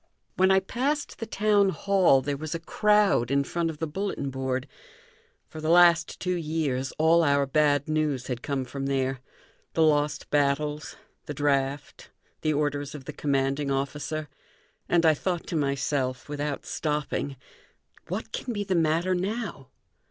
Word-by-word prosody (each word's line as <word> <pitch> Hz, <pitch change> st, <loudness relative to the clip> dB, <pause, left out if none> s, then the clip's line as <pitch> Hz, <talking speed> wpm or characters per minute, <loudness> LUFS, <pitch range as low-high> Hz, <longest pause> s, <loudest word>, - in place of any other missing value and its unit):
When 190 Hz, +1 st, +4 dB
I 190 Hz, 0 st, +5 dB
passed 270 Hz, +9 st, -2 dB
the 225 Hz, -, -4 dB
town 205 Hz, -1 st, +3 dB
hall 185 Hz, -6 st, +3 dB
there 145 Hz, +1 st, -1 dB
was 155 Hz, +3 st, -5 dB
a -, -, -3 dB
crowd 205 Hz, -, +2 dB
in 140 Hz, +1 st, +2 dB
front 170 Hz, +3 st, -1 dB
of 160 Hz, -, -6 dB
the 160 Hz, -, -2 dB
bulletin 160 Hz, -4 st, -3 dB
board. 130 Hz, -1 st, -2 dB, 0.8 s
For 155 Hz, -, -9 dB
the 155 Hz, -, -1 dB
last 170 Hz, -1 st, +5 dB
two 180 Hz, 0 st, -1 dB
years 150 Hz, -6 st, -1 dB
all 165 Hz, +2 st, +4 dB
our 140 Hz, -2 st, +3 dB
bad 145 Hz, 0 st, +2 dB
news 155 Hz, -4 st, 0 dB
had 125 Hz, -2 st, -4 dB
come 140 Hz, -3 st, -2 dB
from 135 Hz, +2 st, -5 dB
there 135 Hz, -1 st, 0 dB, 0.5 s
the 160 Hz, -, +3 dB
lost 150 Hz, -1 st, +1 dB
battles, 145 Hz, +1 st, 0 dB, 0.3 s
the 150 Hz, -, -5 dB
draft, 140 Hz, -1 st, -1 dB, 0.3 s
the 155 Hz, -, +1 dB
orders 145 Hz, -1 st, -1 dB
of 135 Hz, -3 st, -9 dB
the -, -, -6 dB
commanding 140 Hz, 0 st, 0 dB
officer 150 Hz, +3 st, -2 dB, 0.6 s
and 170 Hz, -1 st, +3 dB
I 160 Hz, -, +6 dB
thought 175 Hz, +3 st, -2 dB
to -, -, -4 dB
myself, 140 Hz, -3 st, -1 dB
without 145 Hz, -1 st, -3 dB
stopping: 150 Hz, -2 st, -2 dB, 0.7 s
"What -, -, -4 dB
can 245 Hz, -, -4 dB
be 205 Hz, -1 st, -2 dB
the 195 Hz, -1 st, -1 dB
matter 165 Hz, +2 st, +2 dB
now?" 195 Hz, -, -3 dB
150 Hz, 160 wpm, -27 LUFS, 140-170 Hz, 0.8 s, I